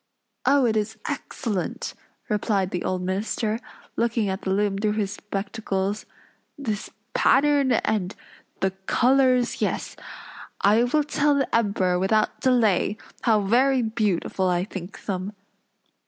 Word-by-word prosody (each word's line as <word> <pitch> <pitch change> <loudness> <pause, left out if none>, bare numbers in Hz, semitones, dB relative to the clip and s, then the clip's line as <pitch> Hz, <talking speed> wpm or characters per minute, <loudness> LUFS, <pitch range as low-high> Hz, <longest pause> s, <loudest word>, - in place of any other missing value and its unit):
"Oh, 275 -1 +5
it 225 -2 +2
is 220 +1 -1
excellent!" 235 -8 -3 0.3
replied 205 -3 0
the 180 - -2
old 185 -1 -1
minister, 210 +4 -1 0.4
looking 230 -3 +1
at 190 +1 -3
the - - -4
loom 200 0 +1
through 210 0 +1
his 205 -2 -1
spectacles. 200 0 -3 0.5
"This 220 -8 -3 0.2
pattern, 280 -2 +4
and 210 -4 0 0.5
the 190 - +2 0.2
colors, 255 -1 +3
yes, - - -1 0.6
I 215 +4 +4
will 300 +5 +2
tell 290 0 +2
the 275 -2 0
Emperor 195 -5 +2
without 215 +3 +1
delay, 220 -5 +2 0.2
how 220 -3 +3
very 250 +5 +3
beautiful 205 -4 0
I 175 0 +1
think 190 -1 -8
them." 195 0 -3
215 Hz, 125 wpm, -24 LUFS, 195-245 Hz, 0.6 s, Oh